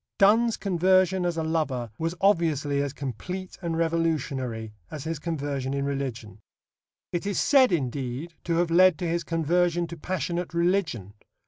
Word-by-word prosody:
Donne's 225 Hz, +3 st, +4 dB
conversion 185 Hz, -1 st, +2 dB
as 170 Hz, -1 st, -2 dB
a 160 Hz, -, 0 dB
lover 140 Hz, -8 st, -1 dB
was 165 Hz, +2 st, -1 dB
obviously 155 Hz, -7 st, +2 dB
as 140 Hz, -1 st, -2 dB
complete 150 Hz, -, -6 dB
and 165 Hz, -2 st, -2 dB
revolutionary 140 Hz, -9 st, -1 dB, 0.2 s
as 150 Hz, -3 st, -6 dB
his 160 Hz, -2 st, -3 dB
conversion 140 Hz, -4 st, -3 dB
in 140 Hz, 0 st, -1 dB
religion. 125 Hz, -7 st, -4 dB, 0.7 s
It 175 Hz, +3 st, -2 dB
is 200 Hz, -, 0 dB
said, 265 Hz, -5 st, +5 dB
indeed, 135 Hz, +1 st, -2 dB
to 170 Hz, -, 0 dB
have 170 Hz, 0 st, +1 dB
led 185 Hz, -1 st, +6 dB
to 175 Hz, -, -3 dB
his 170 Hz, +1 st, -1 dB
conversion 170 Hz, +2 st, +1 dB
to 170 Hz, 0 st, -8 dB
passionate 175 Hz, +1 st, -3 dB
religion. 170 Hz, -, 0 dB
165 Hz, 150 wpm, -26 LUFS, 140-175 Hz, 0.7 s, led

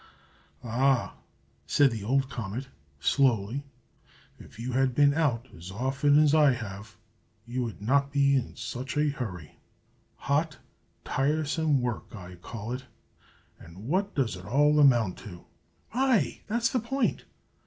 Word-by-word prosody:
"Ah!" 125 Hz, +2 st, +1 dB, 0.5 s
said 140 Hz, -2 st, +4 dB
the 110 Hz, -3 st, -5 dB
old 135 Hz, +5 st, +1 dB
comet, 120 Hz, +1 st, -5 dB, 0.3 s
slowly, 125 Hz, -, +1 dB, 0.8 s
"if -, -, -14 dB
you 120 Hz, +3 st, -4 dB
had 130 Hz, 0 st, +1 dB
been 145 Hz, 0 st, +5 dB
out 135 Hz, -6 st, 0 dB
as 85 Hz, +2 st, -10 dB
often 135 Hz, +7 st, +2 dB
as 150 Hz, -1 st, +5 dB
I 150 Hz, -4 st, +5 dB
have, 105 Hz, -4 st, -8 dB, 0.5 s
you 120 Hz, +2 st, -3 dB
would 110 Hz, -3 st, -7 dB
not 140 Hz, +4 st, +2 dB
be 140 Hz, -1 st, +3 dB
in 130 Hz, -3 st, -2 dB
such 120 Hz, +4 st, -5 dB
a 150 Hz, 0 st, +3 dB
hurry. 100 Hz, -, -6 dB, 0.6 s
Hot, 145 Hz, +1 st, -1 dB, 0.5 s
tiresome 150 Hz, 0 st, +1 dB
work, 120 Hz, -2 st, -4 dB
I 90 Hz, -3 st, -9 dB
call 105 Hz, +5 st, -7 dB
it. 130 Hz, +1 st, -5 dB, 0.7 s
And 90 Hz, +7 st, -12 dB
what 195 Hz, +6 st, 0 dB
does 125 Hz, -8 st, 0 dB
it 90 Hz, 0 st, -10 dB
all 150 Hz, +5 st, +3 dB
amount 120 Hz, -9 st, +4 dB
to?" 90 Hz, -5 st, -11 dB, 0.5 s
"Ay, 255 Hz, -3 st, +1 dB
that's 230 Hz, +2 st, +1 dB
the 255 Hz, -, +1 dB
point!" 245 Hz, +2 st, -1 dB
130 Hz, 140 wpm, -28 LUFS, 115-145 Hz, 0.8 s, been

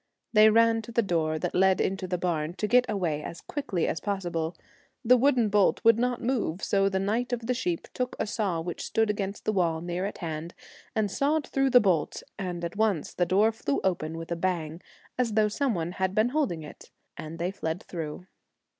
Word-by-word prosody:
They 215 Hz, 0 st, +7 dB
ran 225 Hz, +1 st, +4 dB
to 225 Hz, -, -10 dB
the 235 Hz, 0 st, +2 dB
door 160 Hz, -4 st, 0 dB
that -, -, -3 dB
led 190 Hz, 0 st, +4 dB
into 190 Hz, -1 st, -1 dB
the 180 Hz, 0 st, -1 dB
barn 170 Hz, -2 st, -2 dB
to 210 Hz, -, -2 dB
get 250 Hz, +3 st, +4 dB
away 165 Hz, -7 st, -1 dB
as 165 Hz, -, -7 dB
quickly 240 Hz, -, -2 dB
as -, -, -1 dB
possible. 175 Hz, -5 st, -3 dB, 0.5 s
The 250 Hz, +2 st, +7 dB
wooden 250 Hz, -3 st, +3 dB
bolt 205 Hz, -1 st, +3 dB
would 230 Hz, 0 st, +6 dB
not 245 Hz, 0 st, 0 dB
move, 230 Hz, -8 st, -1 dB
so 195 Hz, -1 st, +2 dB
the 190 Hz, -, -1 dB
knight 220 Hz, +6 st, -1 dB
of 240 Hz, -2 st, -2 dB
the 250 Hz, -, +1 dB
sheep 180 Hz, -9 st, -2 dB
took 250 Hz, -1 st, -2 dB
a -, -, -1 dB
saw 200 Hz, -6 st, -1 dB
which 175 Hz, 0 st, -5 dB
stood 225 Hz, -1 st, +1 dB
against 200 Hz, -1 st, -4 dB
the -, -, +2 dB
wall 170 Hz, -4 st, +1 dB
near 175 Hz, +2 st, -3 dB
at 205 Hz, -, -7 dB
hand, 165 Hz, 0 st, -5 dB, 0.4 s
and 215 Hz, -3 st, +1 dB
sawed 290 Hz, +6 st, +1 dB
through 270 Hz, 0 st, +1 dB
the 250 Hz, -1 st, +7 dB
bolt, 180 Hz, -8 st, 0 dB, 0.2 s
and 175 Hz, -3 st, -3 dB
at 170 Hz, -, -5 dB
once 210 Hz, -7 st, 0 dB
the 175 Hz, -, 0 dB
door 205 Hz, +5 st, +4 dB
flew 225 Hz, +5 st, -2 dB
open 165 Hz, -4 st, -1 dB
with 165 Hz, +1 st, -7 dB
a -, -, +1 dB
bang, 170 Hz, -2 st, -2 dB, 0.4 s
as 235 Hz, -3 st, +1 dB
though 215 Hz, 0 st, +4 dB
some 255 Hz, +1 st, 0 dB
one 170 Hz, 0 st, -2 dB
had 190 Hz, +1 st, -2 dB
been 215 Hz, +3 st, +3 dB
holding 250 Hz, -, -1 dB
it, 150 Hz, -, -12 dB, 0.3 s
and 155 Hz, +1 st, -7 dB
they 175 Hz, +2 st, -1 dB
fled 165 Hz, -1 st, -4 dB
through. 165 Hz, 0 st, -6 dB
195 Hz, 215 wpm, -27 LUFS, 170-225 Hz, 0.5 s, They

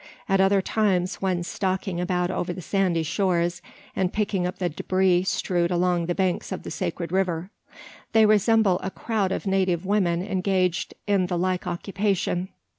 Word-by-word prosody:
At 195 Hz, -1 st, +3 dB
other 195 Hz, 0 st, +3 dB
times, 185 Hz, -5 st, +1 dB
when 185 Hz, -2 st, 0 dB
stalking 185 Hz, -1 st, -2 dB
about 180 Hz, 0 st, 0 dB
over 180 Hz, -, -2 dB
the 185 Hz, -, -8 dB
sandy 185 Hz, -4 st, +1 dB
shores; 175 Hz, 0 st, 0 dB, 0.3 s
and 185 Hz, -1 st, 0 dB
picking 200 Hz, -4 st, 0 dB
up 180 Hz, -, -5 dB
the 180 Hz, -, 0 dB
debris 185 Hz, +2 st, +1 dB
strewed 175 Hz, -2 st, 0 dB
along 175 Hz, -1 st, +1 dB
the 175 Hz, -, -1 dB
banks 185 Hz, -2 st, -1 dB
of -, -, -4 dB
the -, -, -7 dB
sacred 170 Hz, -2 st, -3 dB
river; 185 Hz, -1 st, -1 dB, 0.6 s
they 220 Hz, -2 st, +5 dB
resemble 215 Hz, -2 st, +4 dB
a 190 Hz, -, -3 dB
crowd 205 Hz, -1 st, -1 dB
of -, -, -3 dB
native 190 Hz, -2 st, +1 dB
women 185 Hz, -4 st, +1 dB
engaged 185 Hz, -2 st, 0 dB
in 195 Hz, -3 st, +2 dB
the 175 Hz, -1 st, -1 dB
like 185 Hz, +1 st, -1 dB
occupation. 190 Hz, 0 st, -1 dB
185 Hz, 165 wpm, -25 LUFS, 175-195 Hz, 0.6 s, they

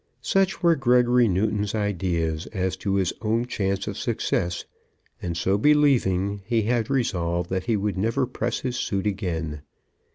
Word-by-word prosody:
Such 190 Hz, +7 st, +1 dB
were 170 Hz, -1 st, +5 dB
Gregory 125 Hz, -2 st, +4 dB
Newton's 105 Hz, +2 st, 0 dB
ideas 90 Hz, -6 st, -1 dB
as 95 Hz, -3 st, -2 dB
to 100 Hz, 0 st, -1 dB
his 95 Hz, -3 st, +1 dB
own 115 Hz, +2 st, 0 dB
chance 100 Hz, -4 st, -2 dB
of -, -, -5 dB
success, 85 Hz, 0 st, -1 dB, 0.6 s
and, 85 Hz, -2 st, -3 dB
so 95 Hz, +4 st, +1 dB
believing, 105 Hz, -9 st, +3 dB
he 115 Hz, +1 st, +1 dB
had 115 Hz, 0 st, 0 dB
resolved 90 Hz, -10 st, -1 dB
that 95 Hz, 0 st, -1 dB
he 115 Hz, -3 st, +1 dB
would 100 Hz, -1 st, -2 dB
never 115 Hz, +6 st, +1 dB
press 125 Hz, -, -3 dB
his 125 Hz, -2 st, -2 dB
suit 95 Hz, -1 st, -2 dB
again. 80 Hz, -7 st, -2 dB
100 Hz, 155 wpm, -25 LUFS, 95-120 Hz, 0.6 s, were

